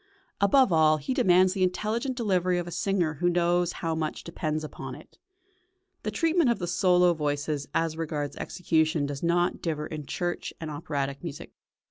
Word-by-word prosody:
Above 200 +3 +4
all, 155 -1 +5
he 155 - -3
demands 185 -7 +4
the 195 - -3
intelligent 220 +8 0
delivery 185 -6 +1
of 175 - -2
a 175 - -7
singer 180 -4 0
who 175 - +4
knows 175 0 +2
how 165 -2 -3
much 160 -1 -3
depends 155 -2 -3
upon 135 -4 -7
it. 150 - -16 0.8
The - - -3
treatment 325 - +2
of 235 - +2
the 175 - -3
solo 180 0 +3
voices 145 -1 -2
as 165 -1 +1
regards 150 -3 -3
execution 160 -3 0
does 140 -1 -5
not 175 +1 +1
differ 155 -3 -2
in 150 -3 -7
church 175 +3 -3
and 160 -2 -5
operatic 140 -2 -3
music. 155 -4 -7
170 Hz, 170 wpm, -27 LUFS, 155-185 Hz, 0.8 s, all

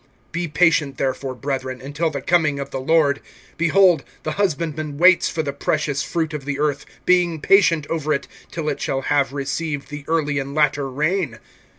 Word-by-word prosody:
(7)Be 170 -2 -3
patient 150 -4 +2
therefore, 130 0 -2
brethren, 130 -1 -3
until 145 +5 -2
the 140 -3 -5
coming 155 -5 +2
of 140 0 -5
the 135 - -3
Lord. 145 0 +2 0.3
Behold, 170 -2 +4 0.2
the 155 - -2
husbandman 155 -5 -2
waits 180 +2 +5
for 160 - -2
the 140 -2 -3
precious 145 -1 -1
fruit 160 0 -2
of 150 -2 -4
the 140 0 -3
earth, 145 -2 -1 0.2
being 175 -3 +3
patient 170 -3 +4
over 155 -2 -2
it, 140 - -1 0.2
till 160 -2 -4
it 145 - -2
shall 135 - -1
have 140 -1 +1
received 145 +1 -3
the 145 -1 -7
early 150 -3 0
and 140 +1 -5
latter 145 -2 +2
rain. 150 -1 -1
150 Hz, 180 wpm, -21 LUFS, 140-165 Hz, 0.3 s, waits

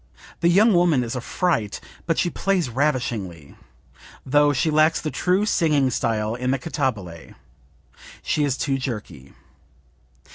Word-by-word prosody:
The 170 - +3
young 210 +5 +5
woman 170 -7 +3
is 115 +1 -4
a 125 - -3
fright, 120 - -1 0.3
but 165 - +1
she 175 - +1
plays 185 -7 0
ravishingly, 115 - -2 0.7
though 145 +2 +3
she 145 +3 0
lacks 155 +1 +3
the 155 - -4
true 185 +3 +1
singing 150 -9 +2
style 110 -2 -1
in 125 +1 -3
the 135 - +1
cantabile; 115 - -4 0.9
she 150 - 0
is 140 -2 0
too 135 -2 -1
jerky." 105 - -6
135 Hz, 140 wpm, -23 LUFS, 115-165 Hz, 0.9 s, young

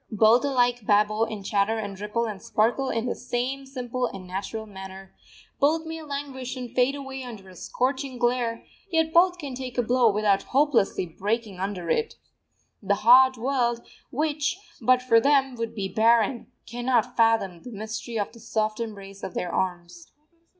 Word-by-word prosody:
Both 220 +3 +4
alike 245 -5 +1
babble 215 +1 +3
and 215 -3 -7
chatter 205 +3 +1
and 200 -3 -5
ripple 220 +3 -1
and 210 -4 -5
sparkle 240 +5 +1
in 230 +1 -1
the 245 - -1
same 265 +3 -3
simple 255 -2 -3
and 190 -4 -9
natural 200 +4 -5
manner; 190 -1 -10 0.5
both 315 +3 +2
may 320 0 -6
languish 280 -3 -5
and 250 -2 -7
fade 255 +2 +2
away 270 -1 -6
under 225 -6 -9
a 185 - -14
scorching 260 - -2
glare, 240 -1 0 0.2
yet 320 -2 +1
both 360 +1 +5
can 285 -6 -6
take 255 -1 -6
a 245 - +3
blow 245 0 +4
without 205 -1 +2
hopelessly 265 -9 +2
breaking 200 +3 -3
under 190 -3 -3
it. 455 0 0 0.7
The 200 0 +1
hard 260 +2 +7
world, 240 -1 0 0.2
which, 300 +3 -1 0.2
but 255 +2 +4
for 230 -3 +5
them, 270 +1 +3
would 230 -1 -4
be 200 -3 -2
barren, 225 +4 +2 0.2
cannot 245 +1 0
fathom 225 -7 +2
the - - -9
mystery 220 +1 -5
of 205 - -2
the 230 - -15
soft 215 -1 -2
embrace 200 -3 -7
of 185 - -6
their 175 -1 -3
arms. 185 - -3
235 Hz, 170 wpm, -26 LUFS, 210-260 Hz, 0.7 s, hard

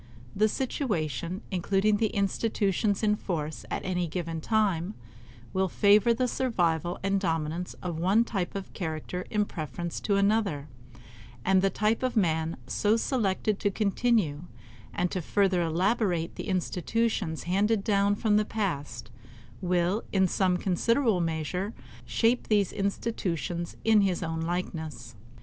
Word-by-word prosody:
The 215 +2 +3
situation, 185 - -2
including 195 +3 +2
the 220 +1 +2
institutions 200 0 0
in 210 -1 +3
force 160 -7 -4
at - - -3
any 180 -2 0
given 165 -1 -4
time, 205 -2 +1 0.6
will 190 0 +2
favor 205 +4 +4
the 250 +2 +1
survival 175 - 0
and 195 0 +2
dominance 165 -1 -2
of 170 -3 -3
one 195 +7 +4
type 195 -7 -3
of 195 -1 -6
character 165 +1 -4
in 210 -1 +1
preference 160 -1 -5
to 200 - 0
another; 200 -8 +1 0.8
and 190 0 +4
the 195 - +3
type 215 +4 +1
of 255 -2 -1
man 160 -4 +1
so 210 - +2
selected 215 -4 0
to 205 - +1
continue 200 -6 +1 0.5
and 180 0 -1
to 185 - -2
further 190 +1 +2
elaborate 175 +1 +1
the - - -6
institutions 185 -1 -1
handed 200 +4 +1
down 200 -1 +2
from 210 -1 +2
the 215 - +3
past 145 - -3 0.5
will 180 +3 +1
in 190 -1 +3
some 180 0 +2
considerable 215 +3 +2
measure 170 +5 -2 0.3
shape 225 - +2
these 205 -3 +2
institutions 175 - -2
in 220 -2 +5
his 185 -3 +1
own 160 0 -2
likeness. 160 -8 -4
190 Hz, 135 wpm, -28 LUFS, 170-210 Hz, 0.8 s, in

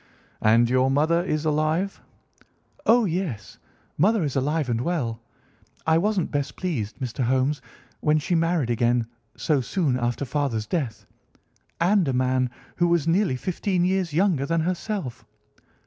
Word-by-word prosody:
"And 115 +2 +5
your 130 +2 +2
mother 155 +5 +2
is 155 -3 -2
alive?" 155 +5 0 0.9
"Oh, 235 0 +5
yes, 160 - -3 0.4
mother 205 +3 +3
is 145 -4 -2
alive 145 +2 0
and 120 -1 0
well. 125 -8 -2 0.6
I 160 0 +4
wasn't 200 -1 0
best 145 -2 -2
pleased, 130 - -3
Mr. 125 0 -3
Holmes, 130 +3 +1 0.4
when 150 0 +2
she 155 +4 -1
married 165 -6 +1
again 120 0 +2 0.3
so 150 -4 +1
soon 135 -1 0
after 120 +3 -1
father's 125 -5 -1
death, 125 - -3 0.7
and 185 0 +3
a 135 - 0
man 130 0 +1 0.3
who 175 - +3
was 170 -3 +1
nearly 175 -4 +2
fifteen 180 +5 -1
years 185 -2 0
younger 160 -4 +1
than 165 0 +1
herself. 180 - -3
150 Hz, 145 wpm, -24 LUFS, 125-175 Hz, 0.9 s, And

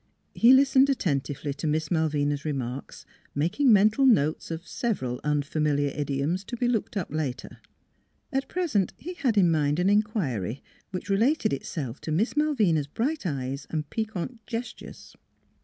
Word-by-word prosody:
He 235 - +6
lis 270 +1 +5
tened 270 +1 +6
attentively 145 - -1
to 145 +3 -4
Miss 155 0 -1
Malvina's 145 -3 0
remarks, 135 -3 -5 0.3
making 175 - +2
mental 215 +5 +5
notes 155 - +2
of 165 +1 -6
several 130 - -2
unfamiliar 145 -1 0
idi 140 -1 -2
oms 175 +6 -1
to 240 - -5
be 245 - +1
looked 225 -3 -1
up 185 - -3
later. 145 -4 -4 0.7
At 270 0 0
present 290 - 0
he 355 +4 -7
had 255 -10 0
in 175 -4 +5
mind 150 -2 +1
an 180 +3 +3
inquiry, 145 - 0 0.3
which 185 +1 -5
related 230 - +2
itself 135 -2 -5
to 155 - -5
Miss 195 +10 +1
Malvina's 215 - +2
bright 250 - -2
eyes 135 -2 -4
and 155 -2 -3
piquant 220 +1 -4
gestures. 235 +1 -7
165 Hz, 155 wpm, -26 LUFS, 145-230 Hz, 0.7 s, He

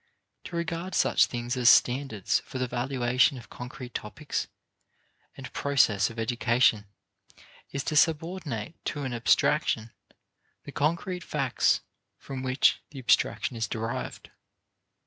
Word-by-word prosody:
To 175 - -7
regard 170 +2 -3
such - - +4
things 120 +1 -3
as 125 -1 +5
standards 125 -6 +3
for - - -8
the 130 - 0
valuation 125 +1 +1
of 120 - -12
concrete 125 0 -8
topics 145 +8 -4 0.9
and - - -9
process 110 -8 +2
of 115 - -11
education 115 -2 +2 0.8
is 140 - -3
to 155 - -2
subordinate 160 - 0
to 145 -1 -3
an 130 -2 -3
abstraction 120 -1 +2 0.7
the 145 - -9
concrete 170 +5 -1
facts 135 -6 +1 0.4
from 135 -1 -7
which 130 +1 +2
the 145 - -12
abstraction 125 0 +1
is 110 -2 -2
derived. 115 +2 -5
130 Hz, 125 wpm, -27 LUFS, 120-150 Hz, 0.9 s, as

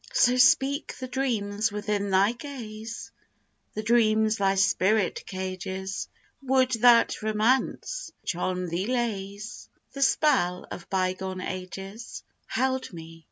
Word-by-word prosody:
So 245 0 +4
speak 270 +3 +3
the 255 - -5
dreams 220 -6 -1
within 205 -1 -2
thy 195 +3 +4
gaze, 230 -4 -8 0.6
The 215 - -3
dreams 220 -1 +3
thy 195 -1 +2
spirit 195 +1 +2
cages, 190 0 -4 0.3
Would 260 -1 +2
that 240 -1 +5
Romance 235 - 0
which - - -2
on 180 +1 -2
thee 175 +5 -2
lays 215 -3 -3 0.2
The 275 - -6
spell 260 - +2
of 175 - -8
bygone 185 0 -1
ages 195 +5 -7 0.2
Held 260 0 -1
me! 165 -1 -10
215 Hz, 115 wpm, -27 LUFS, 190-245 Hz, 0.6 s, that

